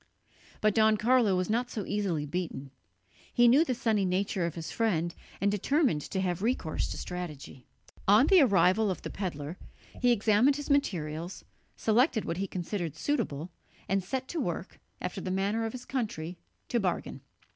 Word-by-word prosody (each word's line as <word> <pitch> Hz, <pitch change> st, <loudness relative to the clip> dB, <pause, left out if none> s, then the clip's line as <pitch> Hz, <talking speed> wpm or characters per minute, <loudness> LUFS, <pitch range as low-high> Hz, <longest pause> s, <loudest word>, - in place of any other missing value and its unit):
But 215 Hz, -1 st, +3 dB
Don 220 Hz, 0 st, +4 dB
Carlo 230 Hz, -3 st, +3 dB
was 180 Hz, 0 st, 0 dB
not 240 Hz, +3 st, 0 dB
so 210 Hz, -6 st, -4 dB
easily 190 Hz, -8 st, -1 dB
beaten; 150 Hz, -4 st, -4 dB, 0.6 s
he 240 Hz, -1 st, +5 dB
knew 270 Hz, +7 st, +6 dB
the 255 Hz, -7 st, -1 dB
sunny 220 Hz, -4 st, +1 dB
nature 185 Hz, -1 st, 0 dB
of 170 Hz, -, -6 dB
his 165 Hz, -2 st, -5 dB
friend, 175 Hz, -7 st, 0 dB, 0.3 s
and 200 Hz, +1 st, +2 dB
determined 245 Hz, -, +1 dB
to 190 Hz, -, -1 dB
have 180 Hz, -1 st, -1 dB
recourse 220 Hz, -8 st, -1 dB
to -, -, -5 dB
strategy. 155 Hz, -8 st, -7 dB, 0.4 s
On 210 Hz, +6 st, +7 dB
the 370 Hz, +1 st, +6 dB
arrival 205 Hz, -3 st, +4 dB
of 185 Hz, -, -3 dB
the -, -, -5 dB
pedlar, 165 Hz, -4 st, -5 dB, 0.4 s
he 245 Hz, -1 st, +5 dB
examined 225 Hz, +4 st, +4 dB
his 290 Hz, 0 st, -4 dB
materials, 170 Hz, -, -1 dB, 0.3 s
selected 230 Hz, +1 st, +2 dB
what 170 Hz, -, -3 dB
he 195 Hz, +1 st, -2 dB
considered 175 Hz, -3 st, -4 dB
suitable, 185 Hz, -, -2 dB, 0.4 s
and 195 Hz, 0 st, +1 dB
set 260 Hz, +7 st, -3 dB
to 335 Hz, -, -2 dB
work, -, -, -4 dB, 0.2 s
after -, -, -4 dB
the -, -, -4 dB
manner 200 Hz, +4 st, 0 dB
of -, -, -5 dB
his 250 Hz, +1 st, -8 dB
country, 185 Hz, -10 st, -3 dB, 0.3 s
to 240 Hz, -, +1 dB
bargain. 185 Hz, -4 st, -2 dB
200 Hz, 170 wpm, -29 LUFS, 175-235 Hz, 0.6 s, On